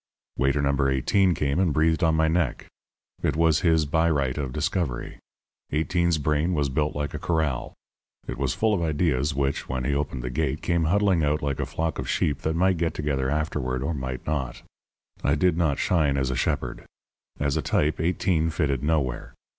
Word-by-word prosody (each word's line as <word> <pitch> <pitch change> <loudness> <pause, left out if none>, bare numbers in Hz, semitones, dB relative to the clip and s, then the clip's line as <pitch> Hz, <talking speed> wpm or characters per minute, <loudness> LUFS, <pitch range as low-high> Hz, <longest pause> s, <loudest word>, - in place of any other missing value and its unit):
Waiter 70 +3 +1
No. 70 0 +2
18 85 +8 +2
came 70 +2 0
and 95 -4 +2
breathed 80 +4 +2
on 80 -1 +3
my 80 0 +3
neck. 80 -4 0 0.6
I - - +3
was 80 -2 +4
his 80 -3 +3
by 80 +3 +2
right 70 -5 0
of 70 -4 -3
discovery. 75 - -2 0.5
Eighteen's 85 +2 +1
brain 75 +4 0
was 70 -2 +1
built 75 +2 -1
like 75 -1 -3
a - - -4
corral. 80 -7 -1 0.5
It 65 - -5
was 65 -2 0
full 110 -1 +2
of 95 - 0
ideas 75 -3 0
which, 70 0 -1
when 65 -1 -2
he 70 - 0
opened 70 -3 -2
the 60 - -3
gate, 75 +1 -1
came 85 -2 +1
huddling 95 -1 +2
out 75 +1 0
like 70 -2 -1
a - - -1
flock 80 -1 -2
of - - -4
sheep 70 -3 0
that 80 0 -1
might 95 +1 +2
get 85 -1 0
together 70 -3 -1
afterward 70 -4 -1
or 80 +4 -1
might 65 -3 -5
not. 70 -5 -3 0.6
I - - +3
did 90 -3 +2
not 80 -5 +1
shine 75 -6 +2
as 65 -1 0
a - - -2
shepherd. - - -2 0.6
As 70 -1 0
a - - 0
type 75 +1 0
Eighteen 85 0 +1
fitted 70 -5 0
nowhere. 75 -5 -1
75 Hz, 195 wpm, -25 LUFS, 70-80 Hz, 0.6 s, was